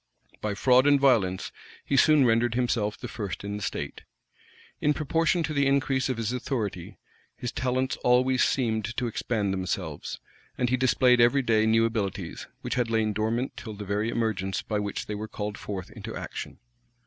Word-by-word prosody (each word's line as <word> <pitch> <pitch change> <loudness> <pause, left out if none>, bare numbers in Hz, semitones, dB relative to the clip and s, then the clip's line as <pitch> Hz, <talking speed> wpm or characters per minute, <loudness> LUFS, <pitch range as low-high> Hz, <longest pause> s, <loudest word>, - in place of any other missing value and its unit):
By 105 -1 -2
fraud 130 +5 +4
and 145 -1 +5
violence, 110 -9 +2 0.3
he 140 - 0
soon 150 0 +6
rendered 115 0 +2
himself 115 -4 0
the - - -7
first 100 -4 -5
in 100 0 -4
the - - -7
state. - - -4 0.8
In 150 0 +2
proportion 165 +3 +1
to 155 - -2
the 140 -1 +2
increase 135 -1 +1
of 130 - -1
his 115 +1 -2
authority, 110 -8 -3 0.4
his 125 - -4
talents 130 +1 -1
always 125 +1 +3
seemed 115 -3 0
to 125 - 0
expand 110 -3 -1
themselves; 90 -5 -4 0.4
and 125 -1 0
he - - +4
displayed 125 -1 +4
every 130 +4 +4
day 110 -2 +3
new 115 +1 +4
abilities, 105 -4 -3
which - - -3
had 125 -2 0
lain 110 -2 +1
dormant 115 +5 -1
till 110 -3 -7
the 105 0 -7
very 105 +3 -1
emergence 100 -5 -1
by 105 -2 -2
which 100 -1 -3
they 105 - -4
were 105 +1 -4
called 105 -1 -4
forth 95 -3 -6
into - - -8
action. - - -6
115 Hz, 180 wpm, -27 LUFS, 105-130 Hz, 0.8 s, soon